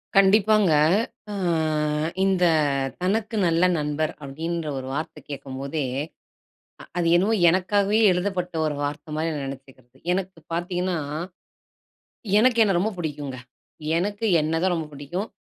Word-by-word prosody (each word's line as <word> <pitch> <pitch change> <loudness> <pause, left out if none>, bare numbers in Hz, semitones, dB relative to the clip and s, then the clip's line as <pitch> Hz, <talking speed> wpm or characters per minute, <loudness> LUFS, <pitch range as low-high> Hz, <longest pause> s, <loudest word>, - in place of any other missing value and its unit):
கண்டிப்பாங்க. 200 -1 +5 0.6
அ - - -4 0.9
இந்த 190 -2 +2 0.6
தனக்கு 215 +4 0
நல்ல 165 +1 +2
நண்பர் 150 +1 -1
அப்டின்ற 160 +4 -4
ஒரு 130 0 -5
வார்த்த 155 +1 -4
கேட்கும்போதே, 140 +2 -4 1.0
அ - - -10
அது 170 - +1
என்னமோ 200 +6 +3 0.2
எனக்காகவே 200 +4 +2
எழுதப்பட்ட 180 -1 -1
ஒரு 150 -2 -1
வார்த்த 150 +2 -4
மாரி 160 +1 0
நெனச்சுக்குறது. 135 -2 -10 0.2
எனக்கு 190 -2 -3
பாத்தீங்கன்னா, 180 +1 -1 1.4
எனக்கு 240 +1 +4
என்ன 195 -4 +2
ரொம்ப 215 +4 0
பிடிக்குங்க. 145 -5 -4 0.6
எனக்கு 205 +5 -2 0.2
என்ன 155 +1 -1
தான் 185 -1 +2
ரொம்ப 160 -2 -3
பிடிக்கும். 160 +9 -5
175 Hz, 115 wpm, -24 LUFS, 150-195 Hz, 1.4 s, கண்டிப்பாங்க